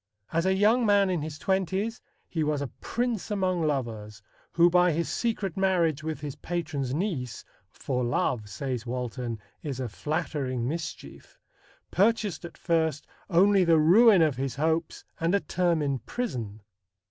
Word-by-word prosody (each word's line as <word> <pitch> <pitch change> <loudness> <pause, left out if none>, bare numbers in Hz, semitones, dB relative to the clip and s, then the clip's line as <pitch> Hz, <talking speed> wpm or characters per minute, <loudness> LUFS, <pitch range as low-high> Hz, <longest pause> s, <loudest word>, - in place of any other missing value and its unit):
As 165 +3 +1
a 190 - +3
young 215 +5 +4
man 200 -3 +4
in 175 -4 -1
his 155 0 -5
twenties, 190 +5 -1 0.3
he 160 -2 -1
was 150 -1 0
a 140 -2 -3
prince 235 -4 -2
among 185 -4 0
lovers, 110 -9 -3 0.3
who 170 0 +6
by 180 0 +4
his 165 +2 -1
secret 215 -6 -2
marriage 175 -6 +2
with 155 0 -4
his 145 -2 -5
patron's 155 -7 -3
niece 145 - -3 0.2
"for 125 +2 -3
love," 120 -2 0
says 125 +4 -4
Walton, 125 -1 -3 0.2
"is 140 -4 -4
a 130 - -2
flattering 135 -1 -2
mischief" 165 +3 -6 0.5
purchased 205 -3 +1
at 170 - -10
first 160 -3 0 0.2
only 195 +2 +5
the 165 -2 +4
ruin 190 +4 +6
of 150 -5 +1
his 135 -1 -2
hopes 160 +2 -1 0.2
and 170 +4 +2
a - - +3
term 170 -1 0
in 140 -2 -1
prison. 120 - -4
160 Hz, 155 wpm, -27 LUFS, 135-190 Hz, 0.5 s, who